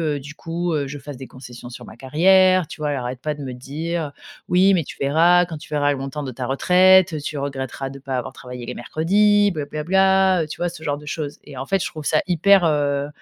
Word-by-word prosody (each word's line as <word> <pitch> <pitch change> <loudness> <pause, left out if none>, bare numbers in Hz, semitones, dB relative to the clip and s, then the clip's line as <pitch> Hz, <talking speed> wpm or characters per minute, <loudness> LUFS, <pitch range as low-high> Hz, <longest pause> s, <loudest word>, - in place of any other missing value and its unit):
heu, - - -4
du 145 +3 -10
coup, 170 +2 -3
heu, 145 -2 -1
je 145 - -7
fasse 140 -1 -9
des 130 - -9
concessions 120 -1 -11
sur 120 0 -10
ma 110 - -13
carrière, 185 +7 +4
tu - - -10
vois? 150 -1 -1
Elle 145 - -1
arrête 125 0 -5
pas 150 -1 -2
de 145 - -10
me 130 - -5
dire: 150 +4 -4 0.3
«Oui, 190 +2 +4
mais 170 -4 +2
tu - - -9
verras, 170 +6 +4
quand 165 -2 -7
tu 150 - -12
verras 145 -1 +2
le 140 - -2
montant 135 +2 -5
de 130 - -5
ta 125 +1 -5
retraite, 185 +6 +4
heu, 155 - -2
tu 150 0 -5
regretteras 135 -1 -4
de 140 0 -10
pas 135 -1 -5
avoir 120 - -4
travaillé 125 -1 -9
les 125 - -5
mercredis, 205 +9 +2
bla 150 -4 -4
bla 150 +1 -5
bla». 190 0 +3
Heu, - - -6
tu 155 - -7
vois, 175 +1 -1
ce 170 -2 -11
genre 145 -1 -1
de 150 - -13
chose? 145 -1 -5
Et 140 -3 -12
en 135 - -5
fait, 195 +1 0
je - - -3
trouve 155 -3 -9
ça 155 - +2
hyper, 185 +2 +4
heu, 145 -2 0
150 Hz, 265 wpm, -21 LUFS, 135-175 Hz, 0.3 s, carrière